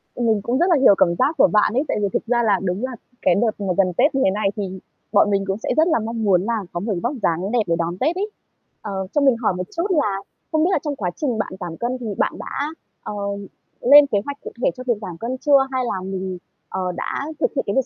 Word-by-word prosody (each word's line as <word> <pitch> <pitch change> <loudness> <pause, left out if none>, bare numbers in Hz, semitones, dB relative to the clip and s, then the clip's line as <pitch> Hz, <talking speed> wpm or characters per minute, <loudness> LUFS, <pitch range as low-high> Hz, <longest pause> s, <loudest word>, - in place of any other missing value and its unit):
Mình 225 -4 +1
cũng 240 +5 -1
rất 350 - +4
là 345 - +5
hiểu 200 - +7
cảm 170 -1 +3
giác 290 +5 +2
của - - +6
bạn 210 +1 +3
ấy, 265 - +2
tại - - -1
vì 200 - +2
thực - - -1
ra 240 0 +2
là 205 -4 +3
đúng 185 +4 -2
là 260 - -5 0.3
cái 180 - +3
đợt 220 -1 0
mà 190 -3 -1
gần 185 -2 +3
Tết 275 +2 +3
như 270 - +2
thế 190 - +4
này 205 0 0
thì 190 -3 -4 0.3
bọn 205 -1 +4
mình 195 0 +1
cũng 195 - -1
sẽ 220 - -5
rất 320 +2 +5
là 320 - +2
mong 225 0 -3
muốn 185 -4 +4
là 225 -1 -1
có 175 - -3
một 210 +4 -2
vóc 240 - 0
dáng 175 +5 0
đẹp 240 - +3
để 170 - +2
đón 170 +1 -2
Tết 310 - +1
ấy. 410 +3 -2 0.5
Ờ, 210 - -6 0.2
cho 295 - +2
mình 270 -3 +5
hỏi 220 -5 +1
một 185 - -2
chút 345 +4 +1
là 210 - +1 0.3
không 315 0 +2
biết 345 - +3
là - - +2
trong 295 -2 -2
quá 180 -7 -2
trình 255 -7 -1
bạn 215 - -2
giảm 170 -3 -6
cân 245 +2 -2
thì 245 - -7
bạn - - +1
đã, 285 +2 -3 0.4
ờ, - - -5 0.7
lên 290 +3 +8
kế 215 -7 +1
hoạch 285 0 -5
cụ - - -7
thể - - +4
cho 255 - -6
việc 235 - +2
giảm 175 -4 -7
cân 245 +5 -4
chưa? 285 +1 +5
Hay 260 -1 0
là 190 -5 -2
mình, 190 -1 -4 0.3
ờ, 185 -1 -2
đã 275 - -3
thực - - +1
hiện 265 - +1
cái 200 - -1
việc 265 - +2
220 Hz, 280 wpm, -21 LUFS, 195-265 Hz, 0.7 s, lên